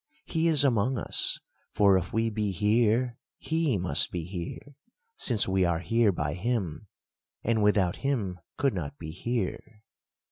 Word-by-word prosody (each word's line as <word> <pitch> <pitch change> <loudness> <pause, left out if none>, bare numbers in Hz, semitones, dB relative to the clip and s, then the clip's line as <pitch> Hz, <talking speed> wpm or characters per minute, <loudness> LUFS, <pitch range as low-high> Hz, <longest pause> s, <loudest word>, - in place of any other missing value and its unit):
He 165 -1 0
is 155 -4 +6
among 125 -1 +1
us; - - +3 0.4
for 100 -2 +5
if 90 -1 -1
we 115 +1 0
be 105 -1 -1
here, 115 +5 +1 0.2
he 160 -7 0
must 90 -1 +2
be 85 -2 -4
here; 90 - -7 0.4
since 115 - +1
we 95 0 +1
are 85 -2 +1
here 115 +5 +2
by 75 -5 -3
him, 100 -2 -3 0.6
and 115 -1 +1
without 100 -4 +2
him 110 -10 -2 0.2
could 140 -3 +1
not 70 -6 -5
be 80 0 -7
here." 110 +2 -4
105 Hz, 150 wpm, -27 LUFS, 90-120 Hz, 0.6 s, is